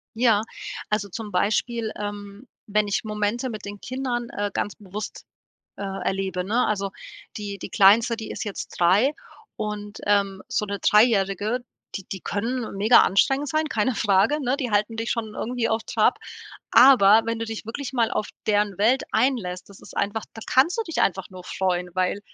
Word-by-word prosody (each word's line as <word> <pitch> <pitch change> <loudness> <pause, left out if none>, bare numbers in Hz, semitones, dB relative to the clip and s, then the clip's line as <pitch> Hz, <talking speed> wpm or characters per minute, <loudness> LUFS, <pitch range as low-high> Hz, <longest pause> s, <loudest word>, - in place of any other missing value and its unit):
Ja, 225 -3 +3 0.5
also 210 -1 -1
zum 210 +2 -7
Beispiel, 220 +4 0
ähm, 205 +3 -7 0.2
wenn 210 0 +1
ich 200 - -1
Momente 215 +4 -2
mit 215 -2 -7
den 205 0 -7
Kindern, 245 -2 -3
äh, 205 0 -3
ganz 205 - -2
bewusst, 205 0 -8 0.5
äh, - - -7
erlebe, 190 -1 -2
ne? 230 +6 +1
Also, 200 -2 -1 0.5
die 205 -1 -5
die - - -7
Kleinste, 220 +4 +5
die 220 -1 -7
ist - - -5
jetzt 205 -2 -5
3 195 +11 +4 0.4
und, 210 -1 -5
ähm, 200 -2 +1
so - - 0
'ne 200 -1 -4
Dreijährige, 210 +1 +3 0.4
die 195 - -7
die 190 -3 -5
können 230 +4 -3
mega 215 +5 +6
anstrengend 270 +9 +2
sein, 310 +1 0
keine 230 +2 0
Frage, 205 +7 +2
ne, 255 +2 +1
die 255 -5 -3
halten 210 +2 +1
dich 225 +1 -3
schon 220 -2 -3
irgendwie 240 -1 -2
auf 220 0 0
Trab, - - +2 0.5
aber 225 -4 +7
wenn 230 0 -2
du 230 - -2
dich 225 -1 -6
wirklich 270 +4 -5
mal 235 -3 +1
auf 210 - -2 0.2
deren 205 -2 +1
Welt 240 +6 +3
einlässt, 220 -8 0
das 200 - -15
ist - - -14
einfach 205 +2 -1
da 225 - -10
kannst 280 +7 +3
du - - +2
dich 330 - -3
einfach 190 0 0
nur 185 -1 -11
freuen, 180 -1 -1
weil 185 +2 0
210 Hz, 180 wpm, -24 LUFS, 200-235 Hz, 0.5 s, aber